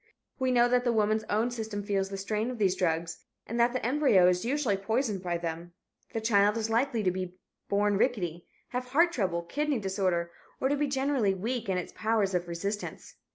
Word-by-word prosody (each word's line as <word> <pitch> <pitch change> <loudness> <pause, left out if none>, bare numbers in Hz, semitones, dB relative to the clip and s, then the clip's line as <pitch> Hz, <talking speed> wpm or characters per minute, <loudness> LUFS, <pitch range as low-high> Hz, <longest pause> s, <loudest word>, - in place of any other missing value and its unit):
We 260 0 +1
know 245 -1 +5
that 245 0 +2
the 240 - +2
woman's 215 -1 +1
own 220 +4 0
system 220 -3 -4
feels 195 -1 -1
the 195 - -5
strain 215 +4 -2
of 250 - -5
these 195 -4 +2
drugs 165 -2 -1 0.3
and 235 +2 -4
that 235 +1 +4
the 255 -2 -3
embryo 250 -9 +4
is 180 +1 +2
usually 255 -4 +1
poisoned 215 +1 -1
by 175 -2 -1
them. 170 0 -5 0.4
The 225 - -1
child 210 -1 +3
is 225 0 -2
likely 235 -1 +1
to 185 - +2
be 185 0 -5 0.3
rickety, 200 -4 +1 0.2
have 250 0 -3
heart 330 +7 +3
trouble, 185 - -1
kidney 290 - -1
disorder, 190 -4 -1 0.3
or 265 - +1
to 285 - +2
be 295 0 0
generally 265 -7 +1
weak 225 +3 -3
in 185 - +1
its 180 - -5
powers 215 -3 +1
of 175 -1 -1
resistance. 200 +5 -5
210 Hz, 200 wpm, -29 LUFS, 185-245 Hz, 0.4 s, know